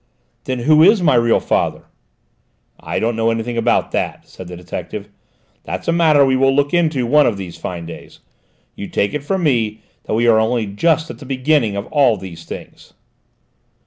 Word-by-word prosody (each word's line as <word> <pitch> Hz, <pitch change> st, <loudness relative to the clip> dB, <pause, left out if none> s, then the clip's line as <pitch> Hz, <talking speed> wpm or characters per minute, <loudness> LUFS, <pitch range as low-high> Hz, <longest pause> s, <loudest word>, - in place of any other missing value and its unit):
"Then 130 Hz, -, -2 dB
who 155 Hz, +4 st, +4 dB
is 200 Hz, +6 st, +6 dB
my 150 Hz, -, +4 dB
real 120 Hz, -1 st, +3 dB
father?" -, -, -1 dB, 1.0 s
"I -, -, -4 dB
don't 115 Hz, +1 st, 0 dB
know 115 Hz, 0 st, +1 dB
anything 115 Hz, +1 st, -2 dB
about 115 Hz, +1 st, +1 dB
that," -, -, -3 dB
said 95 Hz, -, -11 dB
the 90 Hz, 0 st, -8 dB
detective. 90 Hz, +3 st, -7 dB, 0.5 s
"That's -, -, -6 dB
a -, -, +3 dB
matter 155 Hz, -4 st, +4 dB
we 130 Hz, -1 st, +2 dB
will 135 Hz, +1 st, +3 dB
look 145 Hz, +2 st, +1 dB
into 155 Hz, -7 st, +1 dB
one 150 Hz, +5 st, +4 dB
of 110 Hz, -, -1 dB
these 90 Hz, -3 st, -7 dB
fine 85 Hz, 0 st, -6 dB
days! 85 Hz, -, -11 dB, 0.6 s
You 100 Hz, -, -6 dB
take 100 Hz, -, -1 dB
it 150 Hz, -1 st, -3 dB
from 190 Hz, +4 st, -2 dB
me 110 Hz, -7 st, 0 dB, 0.2 s
that -, -, -2 dB
we 115 Hz, +2 st, +1 dB
are 110 Hz, -2 st, +5 dB
only 115 Hz, 0 st, 0 dB
just 160 Hz, +11 st, 0 dB
at -, -, -12 dB
the 140 Hz, -, -11 dB
beginning 130 Hz, -4 st, +1 dB
of 100 Hz, +1 st, -4 dB
all 135 Hz, -7 st, +3 dB
these 85 Hz, -4 st, -10 dB
things." -, -, -11 dB
120 Hz, 190 wpm, -18 LUFS, 105-150 Hz, 1.0 s, is